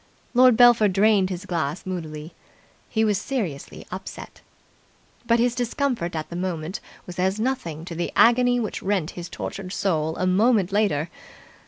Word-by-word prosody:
Lord 250 Hz, -2 st, +6 dB
Belpher 240 Hz, -3 st, +6 dB
drained 200 Hz, 0 st, +3 dB
his 185 Hz, +1 st, -5 dB
glass 165 Hz, -3 st, -3 dB
moodily. 160 Hz, -4 st, -6 dB, 0.6 s
He 220 Hz, -1 st, +1 dB
was 205 Hz, -2 st, +1 dB
seriously 205 Hz, -, -4 dB
upset. -, -, -8 dB, 0.9 s
But 230 Hz, -, +4 dB
his 240 Hz, 0 st, +2 dB
discomfort 245 Hz, -, -2 dB
at 155 Hz, +1 st, -5 dB
that -, -, -5 dB
moment 175 Hz, 0 st, -3 dB, 0.3 s
was 180 Hz, 0 st, -8 dB
as 190 Hz, +3 st, +1 dB
nothing 215 Hz, -, -3 dB
to 175 Hz, -, -7 dB
the 170 Hz, +1 st, -3 dB
agony 245 Hz, +1 st, +5 dB
which 220 Hz, -3 st, -3 dB
rent 190 Hz, -5 st, -1 dB
his 175 Hz, -1 st, -8 dB
tortured 185 Hz, -2 st, -6 dB
soul 160 Hz, -5 st, -1 dB
a 185 Hz, -, 0 dB
moment 200 Hz, +1 st, +3 dB
later. 195 Hz, -7 st, +1 dB
190 Hz, 155 wpm, -24 LUFS, 170-230 Hz, 0.9 s, Lord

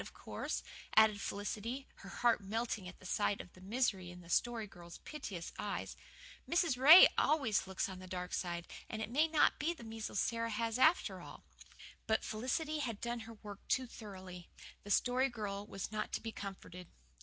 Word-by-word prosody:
Of -, -, -10 dB
course," -, -, -4 dB, 0.3 s
added 215 Hz, -2 st, +6 dB
Felicity, 220 Hz, +6 st, -4 dB
her 195 Hz, -, -11 dB
heart 240 Hz, +1 st, +2 dB
melting 215 Hz, -1 st, -2 dB
at 185 Hz, 0 st, -12 dB
sight 205 Hz, +1 st, +1 dB
of 180 Hz, -, -9 dB
the 185 Hz, -, -16 dB
misery 195 Hz, -3 st, 0 dB
in 180 Hz, 0 st, -10 dB
the 170 Hz, 0 st, -10 dB
Story 235 Hz, +1 st, +1 dB
Girl's 175 Hz, -3 st, -12 dB
piteous 200 Hz, -, -7 dB
eyes, 205 Hz, -1 st, -3 dB, 0.5 s
"Mrs. 335 Hz, -5 st, +3 dB
Ray 300 Hz, +8 st, +11 dB
always 265 Hz, -11 st, +2 dB
looks 190 Hz, -, -1 dB
on 190 Hz, -1 st, -7 dB
the 185 Hz, -, -10 dB
dark 180 Hz, 0 st, -5 dB
side, 175 Hz, -1 st, -2 dB, 0.2 s
and 220 Hz, -, -4 dB
it 220 Hz, +1 st, -4 dB
may 300 Hz, +6 st, +4 dB
not 315 Hz, -1 st, +3 dB
be 330 Hz, +3 st, 0 dB
the 280 Hz, -, -12 dB
measles 225 Hz, -2 st, -4 dB
Sara 230 Hz, 0 st, 0 dB
has 230 Hz, +2 st, -1 dB
after 315 Hz, +7 st, +3 dB
all." -, -, -11 dB, 0.6 s
But 220 Hz, -, +2 dB
Felicity 260 Hz, +8 st, -1 dB
had 230 Hz, -7 st, -3 dB
done 240 Hz, 0 st, -3 dB
her -, -, -8 dB
work 205 Hz, -1 st, -8 dB
too 260 Hz, -, +2 dB
thoroughly. 185 Hz, -6 st, -10 dB, 0.3 s
The 205 Hz, -, -10 dB
Story 255 Hz, +5 st, +3 dB
Girl 205 Hz, -3 st, -4 dB
was 195 Hz, 0 st, -5 dB
not 215 Hz, -, -3 dB
to -, -, 0 dB
be 225 Hz, -, -4 dB
comforted. 185 Hz, -3 st, -8 dB
215 Hz, 185 wpm, -35 LUFS, 190-245 Hz, 0.6 s, Ray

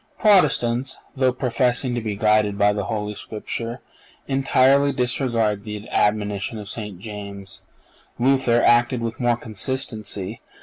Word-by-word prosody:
(488) 215 Hz, -, +4 dB
Protestants, 125 Hz, -4 st, 0 dB, 0.2 s
though 130 Hz, -1 st, +3 dB
professing 125 Hz, 0 st, 0 dB
to 120 Hz, -, -1 dB
be 110 Hz, -2 st, -3 dB
guided 105 Hz, -1 st, +2 dB
by 105 Hz, 0 st, +4 dB
the 100 Hz, -2 st, -3 dB
Holy 105 Hz, -1 st, -3 dB
Scripture, 115 Hz, +3 st, -6 dB, 0.5 s
entirely 135 Hz, +1 st, +3 dB
disregard 120 Hz, -5 st, 0 dB
the 105 Hz, 0 st, -7 dB
admonition 105 Hz, +1 st, 0 dB
of 105 Hz, -1 st, -8 dB
St. 105 Hz, -3 st, -6 dB
James. 100 Hz, -1 st, -9 dB, 0.6 s
Luther 125 Hz, -2 st, +3 dB
acted 120 Hz, +1 st, +4 dB
with 115 Hz, 0 st, -4 dB
more 120 Hz, -2 st, +2 dB
consistency. 110 Hz, -3 st, -4 dB
115 Hz, 130 wpm, -22 LUFS, 105-125 Hz, 0.6 s, 488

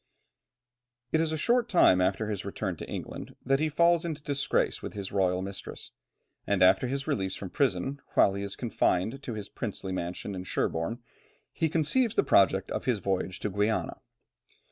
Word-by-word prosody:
It 160 Hz, -, +3 dB
is 160 Hz, -1 st, 0 dB
a 160 Hz, -, -1 dB
short 240 Hz, +8 st, +2 dB
time 95 Hz, -, +5 dB
after 95 Hz, +4 st, +1 dB
his 105 Hz, -3 st, -3 dB
return 100 Hz, -1 st, -3 dB
to -, -, -8 dB
England -, -, -6 dB
that 135 Hz, +1 st, +3 dB
he 155 Hz, +1 st, +1 dB
falls 170 Hz, +2 st, +3 dB
into 155 Hz, -4 st, -4 dB
disgrace 140 Hz, -1 st, 0 dB
with -, -, -6 dB
his 100 Hz, -2 st, -5 dB
royal 95 Hz, -2 st, +1 dB
mistress, 95 Hz, 0 st, -7 dB, 0.6 s
and 100 Hz, -2 st, +3 dB
after 95 Hz, +7 st, +5 dB
his 135 Hz, +2 st, -2 dB
release 95 Hz, -11 st, -1 dB
from 95 Hz, -, -7 dB
prison, 135 Hz, +2 st, 0 dB
while 95 Hz, -, +5 dB
he 100 Hz, -, -4 dB
is 100 Hz, 0 st, -4 dB
confined 115 Hz, +1 st, 0 dB
to 120 Hz, -5 st, -5 dB
his 105 Hz, -2 st, -5 dB
princely 100 Hz, -4 st, -5 dB
mansion 90 Hz, +2 st, -4 dB
of 90 Hz, -1 st, -6 dB
Sherborne, 100 Hz, +9 st, -1 dB, 0.5 s
he 160 Hz, -, 0 dB
conceives 190 Hz, -, +1 dB
the -, -, +4 dB
project 95 Hz, -1 st, +3 dB
of -, -, -3 dB
his 125 Hz, -4 st, +2 dB
voyage 95 Hz, -1 st, -2 dB
to 105 Hz, -, -2 dB
Guiana. 105 Hz, +3 st, 0 dB
105 Hz, 180 wpm, -29 LUFS, 95-140 Hz, 0.6 s, time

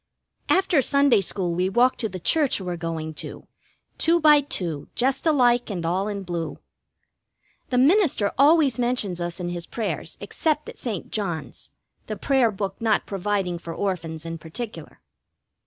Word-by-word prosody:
After 375 Hz, -6 st, +3 dB
Sunday 280 Hz, -4 st, +4 dB
school 180 Hz, -1 st, -1 dB
we 180 Hz, +2 st, 0 dB
walk 245 Hz, +5 st, +3 dB
to 220 Hz, -, -2 dB
the 185 Hz, -, -6 dB
church 290 Hz, -, +3 dB
we're 180 Hz, -2 st, -4 dB
going 165 Hz, -2 st, -4 dB
to, -, -, -9 dB, 0.5 s
two 335 Hz, +1 st, +3 dB
by 300 Hz, -2 st, +6 dB
two, 170 Hz, -, -4 dB
just 265 Hz, +5 st, 0 dB
alike 245 Hz, -6 st, +3 dB
and 175 Hz, -5 st, -4 dB
all 185 Hz, +4 st, 0 dB
in 200 Hz, -2 st, -4 dB
blue. 170 Hz, -4 st, -4 dB, 1.1 s
The 250 Hz, -, 0 dB
minister 280 Hz, -, +3 dB
always 285 Hz, -3 st, +4 dB
mentions 240 Hz, -8 st, -1 dB
us 175 Hz, +1 st, -4 dB
in 175 Hz, -1 st, -3 dB
his 175 Hz, -1 st, -5 dB
prayers, 225 Hz, -3 st, -4 dB
except 305 Hz, -2 st, -1 dB
at -, -, -11 dB
St. 220 Hz, -, -4 dB
John's, 175 Hz, -7 st, -4 dB, 0.4 s
the -, -, -4 dB
prayer 265 Hz, -4 st, +2 dB
book 195 Hz, -2 st, -4 dB
not 225 Hz, -2 st, +1 dB
providing 195 Hz, -3 st, -2 dB
for 165 Hz, -1 st, -7 dB
Orphans 165 Hz, -5 st, -3 dB
in 165 Hz, 0 st, -5 dB
particular. 215 Hz, +8 st, -8 dB
205 Hz, 155 wpm, -24 LUFS, 175-260 Hz, 1.1 s, by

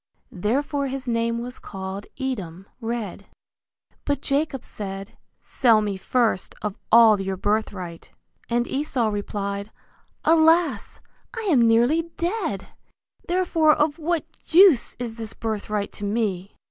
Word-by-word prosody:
(Therefore 275 Hz, -, -1 dB
his 265 Hz, -1 st, -5 dB
name 230 Hz, 0 st, 0 dB
was 245 Hz, +2 st, -6 dB
called 190 Hz, +1 st, -7 dB
Edom, 195 Hz, -10 st, -4 dB
Red.) 225 Hz, -5 st, -4 dB, 0.8 s
But 285 Hz, -1 st, -1 dB
Jacob 280 Hz, -2 st, -1 dB
said, 195 Hz, 0 st, -7 dB, 0.2 s
Sell 230 Hz, -5 st, +3 dB
me 205 Hz, -2 st, -1 dB
first 225 Hz, 0 st, 0 dB
of 210 Hz, -2 st, -2 dB, 0.2 s
all 220 Hz, -3 st, +7 dB
your 190 Hz, 0 st, -3 dB
birthright. 190 Hz, -4 st, -2 dB, 0.4 s
And 240 Hz, 0 st, +1 dB
Esau 265 Hz, -5 st, 0 dB
replied, 200 Hz, 0 st, -3 dB, 0.6 s
Alas! 325 Hz, +1 st, +3 dB, 0.4 s
I 455 Hz, -, -3 dB
am 240 Hz, -6 st, +5 dB
nearly 255 Hz, +9 st, +3 dB
dead, 340 Hz, -, -2 dB, 0.6 s
therefore 340 Hz, -4 st, +3 dB
of 300 Hz, +1 st, +1 dB
what 330 Hz, +1 st, -1 dB, 0.2 s
use 350 Hz, -, +6 dB
is 235 Hz, -2 st, -5 dB
this 225 Hz, -2 st, -6 dB
birthright 210 Hz, -2 st, -3 dB
to -, -, -8 dB
me? 200 Hz, -3 st, -2 dB
230 Hz, 120 wpm, -24 LUFS, 205-285 Hz, 0.8 s, all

